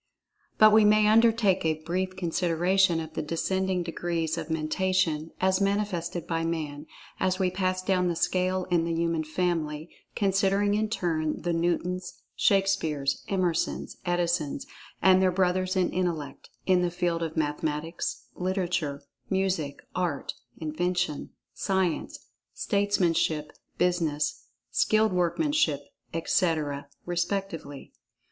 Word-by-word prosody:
But 215 0 +7
we 220 0 +7
may 210 0 +5
undertake 220 -3 +4
a 155 -1 -1
brief 185 +3 -2
consideration 175 0 +2
of 160 -1 -6
the - - -2
descending 185 +4 -1
degrees 165 -1 -2
of 170 - -5
Mentation 160 0 0
as 190 +1 +2
manifested 195 -4 -1
by 165 -1 -1
Man, 155 -3 -3 0.3
as 185 0 +1
we 185 -1 +1
pass 185 0 -1
down 185 -1 +2
the 170 - 0
scale 185 +2 +1
in 170 -2 +3
the 165 0 -1
human 165 -1 0
family, 155 -1 -2 0.2
considering 195 +1 +2
in 215 +1 +1
turn, 160 -8 -1
the 175 0 0
Newtons, 175 +2 -1 0.2
Shakespeares, 165 -8 +1
Emersons, 180 -4 -1
Edisons, 175 -5 0 0.4
and 190 0 +6
their 185 -1 +4
brothers 185 +1 +1
in 185 -2 +2
intellect, 170 -5 -3 0.2
in 185 -1 +4
the 175 - +1
field 175 -1 -1
of 160 -1 -3
mathematics, 150 +2 -2
literature, 180 -6 -2 0.3
music, 190 -7 -1
art, 175 -6 -2 0.2
invention, 175 0 -2 0.2
science, 190 -4 -1 0.3
statesmanship, 175 -7 +1 0.3
business, 155 -8 0 0.2
skilled 215 -2 +3
workmanship, 180 - +1 0.3
etc., 155 -4 0 0.2
respectively. 175 -5 -3
175 Hz, 120 wpm, -27 LUFS, 160-190 Hz, 0.4 s, But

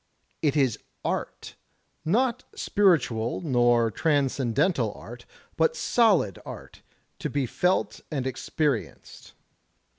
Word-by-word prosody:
It 150 -2 +1
is 130 -6 +2 0.3
art; - - -4 0.5
not 235 +8 +1
spiritual 135 - +2
nor 120 -6 +3
transcendental 140 - +1
art - - -11 0.3
but 485 - +2
solid 210 - +2
arty - - -10 0.4
to - - -3
he 140 -2 0
felt 180 +9 0
and 140 -5 -3
experienced. 130 -1 -3
145 Hz, 95 wpm, -26 LUFS, 120-180 Hz, 0.5 s, nor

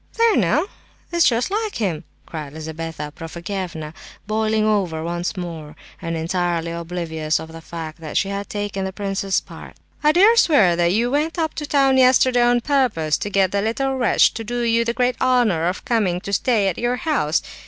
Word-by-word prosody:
"There 460 -2 +4
now! 240 - +2 0.5
It's 340 -1 +4
just 240 +8 -1
like 430 0 -2
him," 175 -7 -2 0.2
cried 150 -3 -7
Lizabetha 160 -1 -6
Prokofievna, 170 -2 -6 0.3
boiling 215 0 0
over 185 -7 0
once 175 +2 -3
more, 160 -4 -6 0.3
and 165 -2 -3
entirely 170 0 -1
oblivious 165 -2 -2
of 160 - -9
the 165 0 -10
fact 165 -1 -7
that 155 -2 -4
she 195 - +1
had 200 0 -3
just - - -35
taken 205 -2 -3
the 190 0 -4
prince's 195 -1 -1
part. - - -12 0.3
"I 300 - +5
dare 400 +8 +5
swear 215 - +5
that 170 0 +2
you 235 +5 +1
went 305 +4 0
up 320 -2 -1
to 295 - -5
town 270 -2 +3
yesterday 255 -1 +5
on 240 0 +3
purpose 230 - +1
to 205 - -3
get 195 -2 +2
the 200 - 0
little 265 +5 -1
wretch 245 -4 +3
to 225 - -5
do 240 +2 -3
you 230 0 +2
the 235 0 -1
great 250 0 0
honour 240 -10 +2
of 180 - -3
coming 205 -7 +1
to 200 - -6
stay 210 0 +2
at 185 - -2
your 240 +1 0
house. 250 - 0
200 Hz, 195 wpm, -21 LUFS, 170-245 Hz, 0.5 s, I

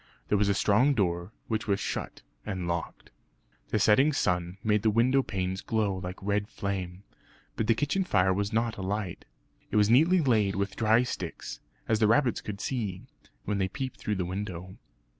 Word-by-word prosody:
There 105 - +3
was 100 -1 +2
a 100 - +2
strong 120 +9 +3
door, 85 -2 0 0.2
which 110 -1 -2
was 100 -1 +1
shut - - -4 0.2
and 95 -4 -4
locked. 85 -1 -4 0.6
The - - 0
setting 130 +9 +4
sun 90 -5 0
made 105 -1 +2
the 110 - +3
window 125 +5 +3
panes 95 -5 -3
glow 105 -3 0
like 90 0 -6
red 100 +1 0
flame; 95 -2 -4 0.5
but 110 - -1
the 115 - +4
kitchen 145 - 0
fire 95 - +2
was 100 +2 -1
not 115 0 0
alight. 95 -1 -3 0.4
It - - -4
was 105 +1 +4
neatly 165 +9 +5
laid 110 - +2
with 100 +1 -2
dry 110 +2 +4
sticks, 90 -8 -5 0.3
as 110 -1 +2
the 110 - +4
rabbits 120 +1 +3
could 100 -1 -6
see, 105 -8 -3 0.4
when 105 -1 -1
they 95 - +1
peeped 130 +6 -5
through 105 - -2
the 95 -2 -1
window. 95 -1 -5
105 Hz, 180 wpm, -28 LUFS, 95-115 Hz, 0.6 s, neatly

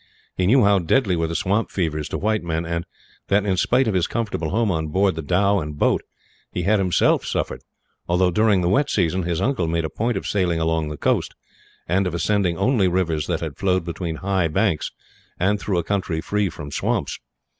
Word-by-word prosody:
He 90 - +1
knew 125 +4 +5
how 100 -1 +4
deadly 95 +2 +2
were 85 -1 0
the 85 - -4
swamp 100 +4 0
fevers 80 -5 -2
to - - -2
white 110 +1 0
men; 85 -1 -2
and 85 +1 -3 0.4
that 100 +1 +2
in 95 -2 +1
spite 125 +7 +2
of 110 - +1
his 90 -2 +1
comfortable 105 -9 -2
home 110 +2 +1
on 80 -2 -1
board 95 +5 +2
the 80 - -5
dhow 100 +6 +2
and 75 -3 -5
boat, - - +2 0.5
he 90 - -3
had 105 +3 +3
himself 90 -2 +2
suffered - - -3 0.5
although, 90 +1 +2
during 105 0 +3
the 85 - 0
wet 135 +11 +2
season, 90 -1 +1
his 85 -2 -2
uncle 125 -11 0
made 85 0 0
a 80 - -4
point 115 -1 -1
of - - -5
sailing 90 -5 0
along 80 -1 0
the 75 - -6
coast, - - 0 0.5
and 95 +3 +1
of 85 - -3
ascending 90 -2 +1
only 115 -5 +2
rivers 85 -4 0
that 80 -4 -3
flowed 95 -3 +1
between 85 -1 -4
high 95 0 0
banks 95 0 0 0.5
and 100 +3 +2
through 100 -3 -1
a 85 - 0
country 95 -3 -1
free 105 +3 0
from 75 -2 -8
swamps. - - -1
90 Hz, 210 wpm, -22 LUFS, 80-100 Hz, 0.5 s, knew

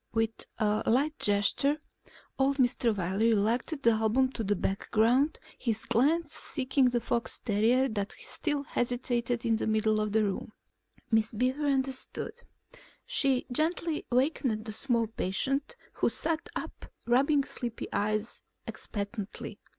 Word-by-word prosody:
With 225 0 -1
a 215 -1 +1
light 285 +6 +2
gesture 205 +8 +2 0.6
old 275 +1 +2
Mr. 245 -4 +2
Wiley 195 +5 +2
relegated 235 +8 0
the 230 - +6
album 225 +4 +2
to 230 - -4
the 205 0 +1
background, 225 - +2 0.2
his 225 -3 -1
glance 295 +7 +2
seeking 265 -3 +1
the 245 -1 +1
fox 235 0 -2
terrier 235 +4 +2
that 205 -3 -3
still 295 -3 -2
hesitated 245 -1 -1
in 225 -1 +3
the - - -2
middle 215 0 +2
of 215 -1 -1
the 220 +1 +3
room. 205 +1 -3 0.6
Miss 220 0 +2
Beaver 255 +6 0
understood. 270 - -1 0.7
She 275 - +2
gently 320 +3 0
wakened 250 -4 +1
the 220 - -4
small 235 +1 +1
patient, 265 - -1 0.2
who - - +3
sat 330 -1 -1
up - - -6 0.2
rubbing 275 +4 +3
sleepy 240 -4 -5
eyes 215 +2 -1 0.2
expectantly. 205 -1 -5
240 Hz, 135 wpm, -29 LUFS, 215-270 Hz, 0.7 s, the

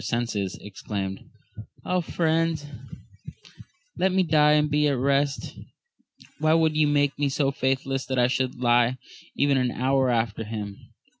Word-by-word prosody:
129 120 0 -1 0.2
senses, 95 - -9
exclaimed, 95 -1 -6 0.6
Ah 180 - +1
friends, 165 -2 0 1.3
let 190 - +2
me 190 0 +2
die 150 -2 +4
and 150 0 +3
be 150 0 +2
at 140 -2 0
rest: 140 +1 0 0.9
why 155 +1 +3
would 160 -1 +2
ye 155 -1 +3
make 145 -1 +1
me 145 -1 +1
so 135 0 0
faithless 135 0 -2
that 130 - -2
I 125 - +4
should 130 0 -1
live 120 0 +3 0.4
even 140 -1 +2
an 125 -1 +1
hour 130 +1 +1
after 115 -2 -1
him 105 -2 -6
135 Hz, 150 wpm, -25 LUFS, 120-150 Hz, 1.3 s, die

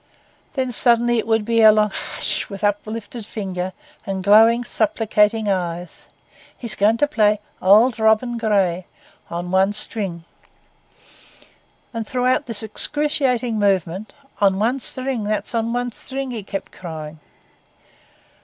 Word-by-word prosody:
Then 260 -2 -1
suddenly, 240 0 +3
it 220 - -4
would 220 -2 +1
be 230 0 +2
a 220 -1 +9
long, 210 -1 +2
'Hush!' - - -4
with 195 -1 -8
uplifted 215 +2 -3
finger 190 -3 -5 0.3
and 190 -1 -4
glowing, 225 +4 +5
supplicating 220 -1 +1
eyes, 175 -3 -3 0.5
'he's 235 -5 -6
going 210 +4 +2
to 290 - +2
play 215 -7 +2 0.2
"Auld 220 +6 +5
Robin 220 +2 +2
Gray" 195 -5 0 0.4
on 175 +1 -5
one 190 +2 +3
string!' 195 -5 -5 1.7
And 225 -2 -4
throughout 255 +2 0
this 225 -2 +6
excruciating 250 -1 0
movement,—'On 200 - -1
one 235 +6 0
string, 255 -2 -2
that's 210 +3 -2
on 230 0 -1
one 245 0 -2
string!' 265 +3 -5
he 230 -3 -5
kept 195 0 -6
crying. 160 -3 -8
215 Hz, 125 wpm, -20 LUFS, 195-240 Hz, 1.7 s, a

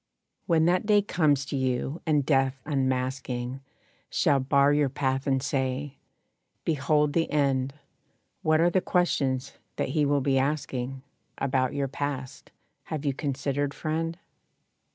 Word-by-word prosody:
When 165 -3 +4
that 180 +4 +2
day 205 -1 +5
comes 150 -8 +2
to 140 - -4
you, 130 +3 -1
and 150 -3 +2
Death, 135 -2 +2
unmasking, 130 -2 -2 0.5
Shall 140 - +3
bar 140 +2 +3
your 145 -2 +2
path, 135 0 -1
and 135 -1 +1
say, 135 0 -2 0.7
"Behold 150 -1 +2
the 165 +1 +1
end," 135 -2 +1 0.7
What 155 0 +3
are 175 +1 +4
the 185 - +2
questions 135 -9 0 0.2
that - - -1
he 150 -3 +2
will 145 0 +2
be 135 0 +2
asking 135 -2 -2 0.3
About 130 -1 0
your 140 -1 0
past? 135 -1 -5 0.4
Have 155 -2 -4
you 140 - +1
considered, 140 0 -2
friend? 165 +2 -2
140 Hz, 135 wpm, -27 LUFS, 130-150 Hz, 0.7 s, day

